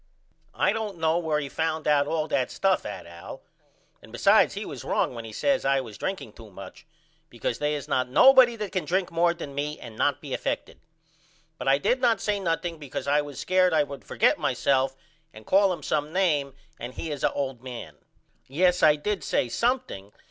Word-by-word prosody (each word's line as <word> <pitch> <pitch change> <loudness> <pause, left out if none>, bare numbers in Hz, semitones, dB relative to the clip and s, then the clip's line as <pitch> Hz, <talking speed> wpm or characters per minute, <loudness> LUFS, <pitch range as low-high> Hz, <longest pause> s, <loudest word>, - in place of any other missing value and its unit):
I 195 - +2
don't 215 -4 -4
know 160 +1 +1
where 160 -3 0
he 145 - -4
found 160 +2 -2
out 145 -1 +3
all 155 0 -1
that 130 -2 0
stuff 190 -1 0
at 105 - -7
Al 85 0 -11 0.6
and - - -16
besides - - +4
he - - -4
was - - -8
wrong - - 0
when 115 -1 -7
he 110 - -8
says 275 - 0
I 135 0 +2
was 115 -5 -8
drinking 190 - -4
to 110 -2 -13
much 100 +9 -12 0.4
because 120 0 -4
they 150 0 0
is 145 - -6
not 130 -1 0
nobody 255 - +7
that 210 -3 -5
can 185 -2 -1
drink 185 0 -1
more 170 +1 +3
than 145 -5 -8
me 150 +2 -3
and 115 -2 -10
not 145 +4 +1
be 145 -3 -7
effected. - - -3 0.8
But - - -5
I 135 +1 +5
did 250 - 0
not 235 -3 +3
say 205 -1 -1
nothing 165 -2 -2
because 140 -1 -6
I 145 +1 +3
was 145 -3 -8
scared 185 -2 +2
I 150 - +4
would 140 -1 -9
forget - - +2
myself 135 -1 +1 0.4
and 110 0 -13
call 195 0 +4
him 170 -5 -5
some 150 +2 -1
name 150 -7 0 0.2
and 125 +2 -7
he 160 - -5
is 145 - -5
a - - +3
old 135 -4 -3
man. 125 -2 -8 0.5
Yes 180 +6 +2
I 150 - +6
did 200 +6 -3
say 120 - 0
something. 235 - -2
150 Hz, 205 wpm, -26 LUFS, 135-185 Hz, 0.8 s, nobody